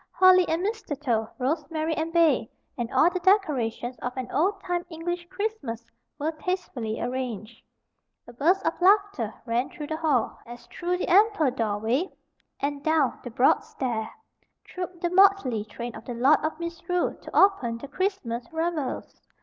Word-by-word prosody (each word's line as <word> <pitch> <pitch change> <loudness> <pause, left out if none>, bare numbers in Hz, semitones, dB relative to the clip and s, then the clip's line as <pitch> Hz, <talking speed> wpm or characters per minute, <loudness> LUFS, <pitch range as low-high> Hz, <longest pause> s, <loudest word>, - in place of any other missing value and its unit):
Holly 370 -1 +6
and 330 +3 0
mistletoe, 290 - -2
rosemary 310 +4 -1
and 315 +1 -2
bay, 315 -9 +3 0.3
and 240 0 -4
all 340 - +4
the 365 - -2
decorations 270 - +1
of 250 +1 -5
an 255 -2 -4
old 390 +6 +1
time 355 -1 -1
English 345 +1 -4
Christmas 375 - -4 0.3
were 305 +2 -1
tastefully 310 -10 -3
arranged. 240 -3 -4 0.7
A 240 - -11
burst 335 +10 +2
of 325 - +2
laughter 395 - +3
ran 240 +2 0
through 315 -4 -7
the 315 +1 -3
hall, 300 -7 0
as 240 0 -10
through 360 0 -2
the - - -3
ample 390 - +4
doorway, 230 - 0 0.5
and 285 0 -2
down 315 -4 +2
the 245 - -6
broad 245 +3 +3
stair, 230 -5 -3 0.5
trooped 360 -1 -7
the 345 -1 0
Motley 365 - +4
train 235 +3 -7
of - - -10
the 245 - -5
Lord 270 +6 +5
of 310 +1 -2
Misrule 340 +1 -2
to - - -7
open 265 -13 +3
the 280 - -8
Christmas 275 - -3
revels. 320 -4 -3
310 Hz, 160 wpm, -26 LUFS, 245-360 Hz, 0.7 s, Holly